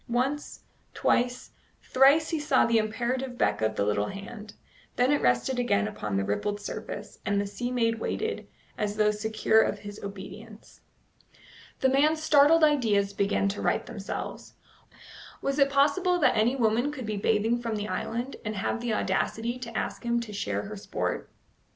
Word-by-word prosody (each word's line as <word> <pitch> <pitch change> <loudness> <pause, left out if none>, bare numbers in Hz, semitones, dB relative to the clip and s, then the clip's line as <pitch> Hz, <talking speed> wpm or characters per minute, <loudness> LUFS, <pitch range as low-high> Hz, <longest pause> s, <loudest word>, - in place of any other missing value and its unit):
Once, 265 +5 -2 0.3
twice, 245 +1 0 0.3
thrice 280 +4 +4
he 325 - 0
saw 295 -3 +3
the 230 -1 +3
imperative 245 +4 -2
beck 105 - +1
of 110 0 0
the 100 - 0
little 105 0 0
hand; 210 +2 -8 0.4
then 250 +3 +3
it 290 - +2
rested 125 - +1
again 105 - +1
upon 105 -1 -3
the 100 - +1
rippled 155 - -2
surface, 205 0 -7
and 200 0 0
the 200 - 0
sea 225 +5 -4
maid 230 -2 +1
waited, 445 - -3 0.3
as 210 -1 -1
though 210 0 +4
secure 220 +1 +2
of - - 0
his 205 0 -10
obedience. 200 +2 -10 1.0
The 265 - +4
man's 300 +4 +3
startled 310 +2 +5
ideas 220 -10 +3
began 200 0 +1
to 200 - -4
right - - 0
themselves. 200 -3 -6 0.8
Was 275 +1 -1
it 275 0 +5
possible 300 +7 +3
that 260 -7 +3
any 230 +4 +2
woman 240 +3 +1
could 265 -5 -6
be 215 -1 -3
bathing 220 +3 +1
from 230 -2 -2
the 210 0 -3
island, 240 +5 -3
and 215 0 -3
have 210 +4 -2
the 235 -3 -1
audacity 225 +6 -1
to 230 -3 -6
ask - - -3
him 235 0 +1
to 220 -3 -8
share 200 - -2
her 210 +1 -7
sport? 195 - -3
225 Hz, 170 wpm, -27 LUFS, 205-260 Hz, 1.0 s, startled